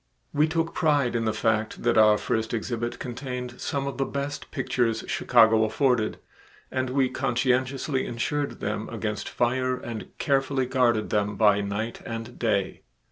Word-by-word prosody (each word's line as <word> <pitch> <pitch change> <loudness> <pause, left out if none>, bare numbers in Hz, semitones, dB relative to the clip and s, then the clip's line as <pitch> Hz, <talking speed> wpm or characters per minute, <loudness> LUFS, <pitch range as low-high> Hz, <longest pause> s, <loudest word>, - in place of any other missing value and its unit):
We 150 +2 +3
took 165 +1 -1
pride 145 -7 +2
in 115 -1 0
the 110 - +2
fact 110 0 -1
that 120 - +2
our 110 -1 +6
first 110 +1 -1
exhibit 120 +1 -3
contained 125 0 -6
some 140 -1 -2
of 140 -1 -5
the 135 - +2
best 140 +1 -4
pictures 120 -4 0
Chicago 110 -2 +4
afforded, 120 -1 +1 0.5
and 130 -1 -1
we 130 0 +2
conscientiously 130 +3 0
insured 145 +5 -2
them - - -3
against - - -3
fire 130 +1 0
and 115 -3 -6
carefully 135 -2 +1
guarded 120 -4 +1
them 105 -1 +1
by 105 -2 +4
night 100 +3 -3
and 115 +1 -6
day. 100 -5 0
125 Hz, 150 wpm, -26 LUFS, 110-135 Hz, 0.5 s, our